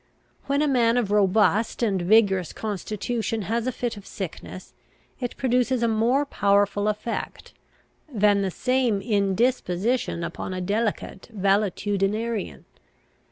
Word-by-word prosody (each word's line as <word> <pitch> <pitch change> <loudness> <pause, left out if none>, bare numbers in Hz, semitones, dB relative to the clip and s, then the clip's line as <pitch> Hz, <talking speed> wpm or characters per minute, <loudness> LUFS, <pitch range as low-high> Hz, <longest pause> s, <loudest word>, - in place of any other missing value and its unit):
When 280 +1 +1
a - - +2
man 240 -3 +3
of 220 -5 0
robust 210 +3 +2
and 195 -5 +1
vigorous 190 -2 +3
constitution 215 +2 -3
has 230 +5 -1
a - - +1
fit 240 -3 -4
of 200 - -12
sickness, 185 0 -8 0.5
it 245 -2 -4
produces 250 -1 +1
a - - +3
more 235 +6 +2
powerful 205 -3 +1
effect, 215 +2 -4 0.6
than 205 -3 +3
the 195 - 0
same 250 +1 0
indisposition 200 -1 0
upon 185 - -5
a - - -3
delicate 205 +1 -2
valetudinarian. 205 +2 -1
215 Hz, 120 wpm, -24 LUFS, 195-235 Hz, 0.6 s, man